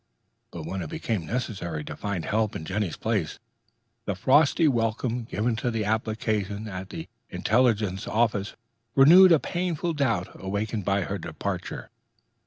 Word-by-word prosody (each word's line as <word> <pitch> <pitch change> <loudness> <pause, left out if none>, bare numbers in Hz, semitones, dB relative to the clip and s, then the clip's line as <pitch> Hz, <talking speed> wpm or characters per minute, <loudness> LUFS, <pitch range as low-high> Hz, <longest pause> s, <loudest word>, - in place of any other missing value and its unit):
But - - -7
when 95 0 -4
it 80 - -5
became 105 -9 -3
necessary 95 -10 -3
to - - -7
find 100 -5 -3
help 110 0 0
in 80 - -5
Jenny's 95 0 -2
place, 105 -8 -1 0.7
the 100 - -1
frosty 145 - +4
welcome 115 -1 0
given 115 +1 -1
to 115 -2 -1
application 110 -1 -1
at 95 -1 -6
the 80 -2 -7 0.2
intelligence 110 -5 +1
offices 105 -3 0 0.4
renewed 175 +7 +8
a 165 - +8
painful 175 0 -2
doubt 115 - 0
awakened 100 +2 -2
by 100 0 +2
her 100 +2 -3
departure. - - -5
110 Hz, 140 wpm, -26 LUFS, 95-120 Hz, 0.7 s, renewed